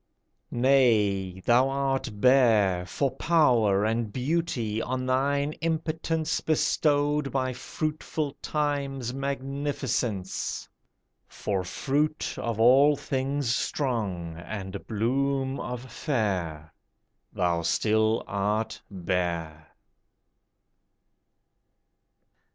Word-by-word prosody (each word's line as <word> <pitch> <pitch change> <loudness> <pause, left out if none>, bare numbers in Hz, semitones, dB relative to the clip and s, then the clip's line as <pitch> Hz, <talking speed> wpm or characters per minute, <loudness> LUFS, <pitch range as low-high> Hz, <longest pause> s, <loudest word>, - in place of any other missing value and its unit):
Nay! 105 -8 +2
thou 125 +3 +4
art 135 -1 -1
bare 110 -8 +4
For 135 +9 0
power 120 -12 +3
and 110 -1 -1
beauty 130 -5 -1
on 130 +1 -2
thine 140 +3 +1
impotence 160 0 -1
Bestowed 145 -2 +1
by 130 -1 -1
fruitful 150 +2 -3
Time's 140 -4 -2
magnificence; 135 -7 -2 0.6
For 95 -3 -2
fruit 150 - -1
of 115 -2 -3
all 135 +6 +6
things 135 -2 -1
strong, 100 - -2
and 95 +2 -7
bloom 135 +4 0
of 125 -1 -4
fair, 90 - -2 0.6
Thou 85 -2 0
still 110 +5 +2
art 105 +3 -1
bare. 85 -4 -3
125 Hz, 80 wpm, -27 LUFS, 100-140 Hz, 0.6 s, all